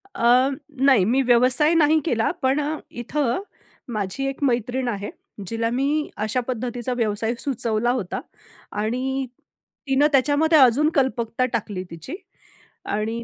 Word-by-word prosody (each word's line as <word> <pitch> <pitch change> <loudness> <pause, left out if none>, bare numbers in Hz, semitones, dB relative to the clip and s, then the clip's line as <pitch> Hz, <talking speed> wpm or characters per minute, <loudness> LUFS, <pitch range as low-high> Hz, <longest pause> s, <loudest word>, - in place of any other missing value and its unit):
अ, 245 +3 +4 0.4
नाही, 260 -9 +6
मी 250 +6 +2
व्यवसाय 255 +6 +4
नाही 315 -1 +4
केला, 230 -8 +1
पण 265 +2 +2
अ, 300 +2 -2 0.2
इथं 270 - -1 0.5
माझी 210 +5 -3
एक 275 +1 -4
मैत्रीण 250 0 0
आहे, 205 -3 -3 0.4
जिला 230 +2 -1
मी 280 +5 0
अशा 220 +4 0
पद्धतीचा 245 0 -3
व्यवसाय 225 -1 -1
सुचवला 240 -3 -1
होता 230 -8 -3 0.6
आणि 260 +5 -1 0.6
तिनं 270 +2 +4
त्याच्यामध्ये 290 +4 +3
अजून 270 +4 +5
कल्पकता 255 -3 +1
टाकली 205 -5 -3
तिची 165 - -7 0.7
आणि 220 +3 -2
250 Hz, 125 wpm, -23 LUFS, 230-275 Hz, 0.7 s, नाही